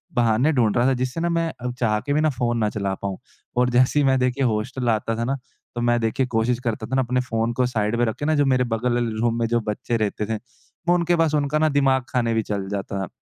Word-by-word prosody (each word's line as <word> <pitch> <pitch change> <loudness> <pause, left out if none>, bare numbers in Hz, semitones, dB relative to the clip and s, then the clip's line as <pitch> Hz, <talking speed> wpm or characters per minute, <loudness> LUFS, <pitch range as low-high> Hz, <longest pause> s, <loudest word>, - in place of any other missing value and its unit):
बहाने 120 +5 +3
ढूँढ़ 115 -6 +2
रहा 120 0 +3
था 135 - +3
जिससे 130 +4 -2
ना 170 - +1
मैं 165 -1 0
अब 125 0 -3
चाह 105 -3 +1
के 145 - -2
भी 150 - +2
ना 155 - +3
फ़ोन 120 -3 -1
ना 110 -2 +1
चला 100 -2 -2
पाऊँ 100 -1 -3 0.4
और 125 0 +3
जैसे 125 +4 +3
ही - - +3
मैं 130 0 +4
देखिए 130 +2 0
हॉस्टल 120 +2 -1
आता 115 0 0
था 115 - -1
ना 135 +3 0 0.4
तो 120 - -2
मैं 120 0 +2
देखिए 120 +4 0
कोशिश 120 0 0
करता 115 -3 -3
था 130 - -2
ना 135 - +3
अपने 125 0 0
फ़ोन 115 -2 -1
को 125 +1 +1
साइड 110 -3 0
में 120 - +3
रखे 110 +6 -3
ना 155 0 +2
जो 145 - +3
मेरे 130 -2 +3
बगल 120 +1 0
ल 120 - 0 0.2
रूम 120 0 +1
में 115 - +1
जो 120 +1 +1
बच्चे 115 +2 -1
रहते 105 0 -1
थे, 110 +1 -2
वो 130 +8 -4
उनके 175 0 +2
पास 165 -2 +2
उनका 145 +1 +1
ना 155 0 +3
दिमाग 135 -3 +2
खाने 120 -2 0
भी 110 - +2
चल 100 -2 -3
जाता 100 -1 -3
था, 95 - -3
120 Hz, 270 wpm, -23 LUFS, 115-135 Hz, 0.4 s, मैं